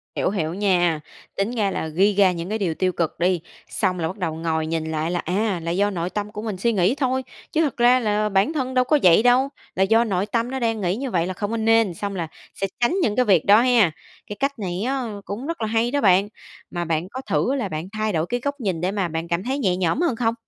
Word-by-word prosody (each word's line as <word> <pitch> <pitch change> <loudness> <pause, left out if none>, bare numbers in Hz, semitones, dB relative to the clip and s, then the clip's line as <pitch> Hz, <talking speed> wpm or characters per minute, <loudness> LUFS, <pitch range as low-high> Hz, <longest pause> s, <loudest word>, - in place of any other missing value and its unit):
Hiểu, - - +1
hiểu 165 -5 -2
nha, 175 -5 +2 0.4
tính 200 +4 0
ra 210 -5 0
là 160 - -3
ghi 190 +7 +2
ra 195 -2 +5
những 170 0 -5
cái 215 - -1
điều 190 -6 -1
tiêu 185 +4 +1
cực 170 -3 -2
đi, 180 0 +1 0.3
xong 185 -3 -1
là 160 - 0
bắt 185 - -6
đầu 165 -5 -2
ngồi 160 -1 -1
nhìn 160 0 -2
lại 160 +1 -1
là 175 - -1
à, 190 +2 -1
là 165 - -2
do 200 +4 +2
nội 175 -3 -3
tâm 210 +1 -4
của 210 -1 -6
mình 215 -3 -4
suy 235 +5 +1
nghĩ 195 +4 +2
thôi, 260 -1 0 0.3
chứ 320 - +2
thật 300 -4 -1
ra 245 +1 +5
là 210 -2 0
bản 195 +10 +2
thân 260 -4 -2
đâu 255 -1 +4
có 295 +4 +2
vậy 180 +4 +6
đâu, 250 +2 +4 0.3
là 190 - +3
do 225 +4 +4
nội 195 -4 -1
tâm 230 +3 -1
nó 265 - -2
đang 225 -3 -1
nghĩ 180 0 0
như 260 +2 -4
vậy 170 -3 +1
là 185 - -3
không 205 +3 -4
có 230 - -1
nên, 225 -3 +3
xong 200 +3 -4
là 170 -3 -3 0.3
sẽ 195 - -2
tránh 240 +8 +2
những 210 - +1
cái 250 - +3
việc 190 -7 +3
đó 210 +3 +7
ha 240 -8 +4 0.4
cái 205 - -6
cách 275 -2 -1
này 185 -2 -3
á 270 0 -1 0.2
cũng 230 +8 -5
rất 335 -6 -4
là 220 - 0
hay 225 +2 +1
đó 285 +1 0
bạn. 195 0 +4 0.4
Mà 175 -1 -3
bạn 165 +1 -1
có 260 +5 -6
thử 265 - +1
là 235 -8 -2
bạn 155 +1 -4
thay 215 -1 -1
đổi 160 -1 +1
cái 245 - -1
góc 285 0 -2
nhìn 190 -9 -2
để 180 +2 0
mà 200 -3 -1
bạn 165 0 -4
cảm 170 +2 -1
thấy 265 +4 -2
nhẹ 185 -8 +1
nhõm 185 - 0
hơn 340 -8 +1
không? 225 -1 +1
205 Hz, 275 wpm, -23 LUFS, 175-235 Hz, 0.4 s, đó